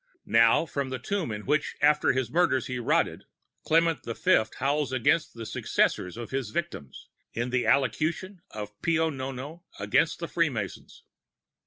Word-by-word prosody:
Now, 115 +7 +4
from 140 -4 -3
the 130 - -3
tomb 170 - -3
in 105 0 -6
which 150 +1 0
after 150 +1 +4
his 130 -3 -2
murders 165 -6 +2
he 125 -1 -4
rotted, 120 - 0 0.4
Clement 165 0 +2
the 115 - -5
Fifth 110 0 +2
howls 140 +1 0
against 145 +5 +1
the 115 -1 -7
successors 90 -2 0
of 120 -1 -7
his 130 -4 -2
victims, 130 - -5 0.3
in 120 +2 -2
the 125 -1 0
Allocution 155 - 0
of 105 -1 -8
Pio 160 -1 +1
Nono 135 +4 -6 0.2
against - - +2
the - - -5
Free - - +1
Masons. - - -6
135 Hz, 160 wpm, -27 LUFS, 115-160 Hz, 0.4 s, Now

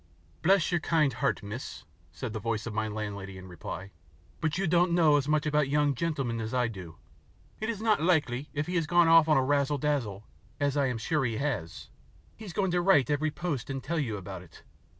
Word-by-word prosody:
"Bless 190 +1 +3
your 175 - +2
kind 155 -6 +2
heart, 120 - -1
miss," 110 +6 -7 0.3
said - - -6
the 110 - -3
voice 115 0 -2
of 115 - -5
my 110 0 -1
landlady 100 -3 -5
in 95 0 -10
reply, 90 +2 -7 0.5
"but 155 -1 -1
you 195 - 0
don't 175 +1 +3
know 160 -4 +5
as 145 -1 +1
much 150 0 +1
about 150 -2 +1
young 145 0 +2
gentlemen 135 -6 -2
as 110 +3 -4
I 125 -2 +2
do. 90 -7 -9 0.6
It 220 - -3
is 220 -2 -3
not 215 -7 +3
likely, 150 -6 +1
if 145 0 -2
he 180 +2 -1
has 165 -3 0
gone 175 0 +4
off 165 -1 +7
on 155 - +5
the 135 - +3
razzle 145 +1 +1
dazzle, 125 -9 -2 0.3
as 145 -1 +1
I 140 -2 +2
am 125 -2 -2
sure 140 +6 0
he 115 -3 -1
has, 110 - -4 0.4
he 220 - -11
is 195 - -7
going 190 -1 0
to 175 0 +2
write 175 -7 +4
every 150 +2 +1
post 155 -6 -4
and 135 -1 -4
tell 165 +3 -1
you 115 -8 -2
about 95 -1 -7
it. 90 - -16
145 Hz, 225 wpm, -29 LUFS, 110-165 Hz, 0.6 s, off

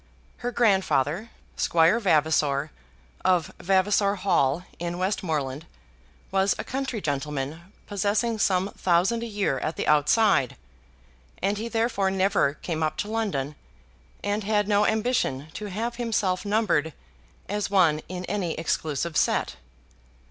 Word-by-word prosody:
Her 245 - -3
grandfather, 195 - +1 0.3
Squire 170 +6 +3
Vavasor 155 -6 +2 0.5
of 180 -3 +2
Vavasor 200 +2 +2
Hall, 175 -5 +1 0.2
in 175 0 -3
Westmoreland, 160 -6 -2 0.6
was 195 0 +2
a - - -4
country 265 -3 -3
gentleman, 150 +2 -4
possessing 205 +3 0
some 190 -1 +2
thousand 190 +6 +1
a 235 - -3
year 200 -11 -1
at 155 - -3
the - - -2
outside, 150 - +3 0.8
and 200 +2 0
he 225 - -3
therefore 225 -4 +1
never 190 -6 +2
came 160 0 -4
up 155 -1 -1
to 210 - -3
London, 190 -11 -1 0.7
and 205 +1 -1
had 210 0 +1
no 205 0 +3
ambition 220 - 0
to 210 - -6
have 230 +5 -3
himself 215 -6 0
numbered 190 -8 +1 0.5
as 205 0 -2
one 170 -6 +3
in 180 0 -5
any 190 -4 -2
exclusive 160 0 -2
set. 65 - +1
190 Hz, 125 wpm, -26 LUFS, 160-210 Hz, 0.8 s, Squire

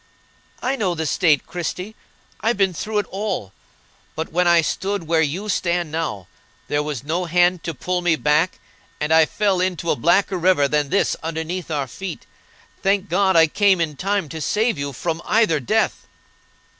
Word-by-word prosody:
"I 260 +2 +1
know 195 -8 -1
the 160 -1 -3
state, 155 -2 +2
Christie: 180 +5 -5 0.4
I've 225 +2 0
been 195 -2 +2
through 210 +6 -3
it 205 - +1
all! 190 - -3 0.6
but 160 +1 -4
when 180 +2 +2
I 170 -1 +6
stood 195 +4 -2
where 160 0 +2
you 165 +7 -2
stand 175 -4 0
now, 150 - -3 0.4
there 145 - 0
was 150 -4 -4
no 170 +5 -1
hand 175 +1 +2
to 165 -3 -3
pull 180 +6 -2
me 175 -2 +3
back, 155 +4 +1 0.4
and 150 +2 0
I 160 -1 +6
fell 195 -3 +1
into 180 -2 -1
a - - +2
blacker 180 +6 +2
river 175 -5 +3
than 150 0 0
this 200 - +1
underneath 165 +3 -4
our 145 -3 -1
feet. 185 +10 -7 0.6
Thank 195 0 +1
God, 190 +1 +2
I 165 -1 +7
came 195 +3 +3
in 160 -3 -1
time 195 +1 -1
to 160 +1 -6
save 220 +9 +1
you 140 0 -3
from 165 +5 -3
either 215 -9 +2
death!" 215 - 0
175 Hz, 180 wpm, -21 LUFS, 155-195 Hz, 0.6 s, I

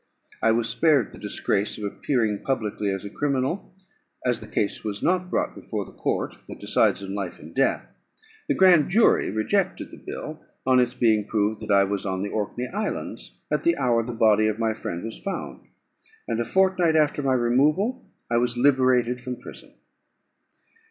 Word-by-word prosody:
I - - +3
was 115 0 +1
spared 150 -7 +2
the - - -12
disgrace 100 +2 -1
of 105 - -7
appearing 105 0 -1
publicly 105 -6 -2
as 95 +1 -3
a - - -5
criminal, 140 - -1 0.5
as 120 -3 +1
the 110 - -9
case 105 -1 -2
was 105 -2 -4
not 180 0 +1
brought - - -1
before - - -5
the - - -13
court - - -2 0.2
that - - -8
decides 100 - +2
on 95 0 -5
life 100 -3 -4
and 80 - -12
death. 135 - 0 0.5
The - - +1
grand 180 -6 +5
jury 215 +5 +4
rejected 180 - -1
the - - -13
bill, - - -7 0.2
on 130 -1 +5
its 125 -1 +1
being 110 -3 +2
proved 105 0 0
that - - -4
I 100 -1 +6
was 100 0 -2
on 95 -1 -2
the 100 - -3
Orkney 110 +4 -3
Islands 210 +2 -5
at - - 0
the 335 0 +3
hour 120 -2 +2
the 125 - -5
body 110 -2 +4
of 110 -1 -1
my 115 -1 0
friend 85 -5 -5
was 115 0 -6
found; 195 -1 -6 0.6
and 115 - -1
a - - -2
fortnight 185 +2 +2
after 150 -1 +2
my 135 -2 +1
removal 150 - +1 0.2
I 120 - +1
was 120 0 0
liberated 125 -2 +3
from 125 0 -4
prison. 125 - -12
120 Hz, 185 wpm, -25 LUFS, 105-145 Hz, 0.6 s, I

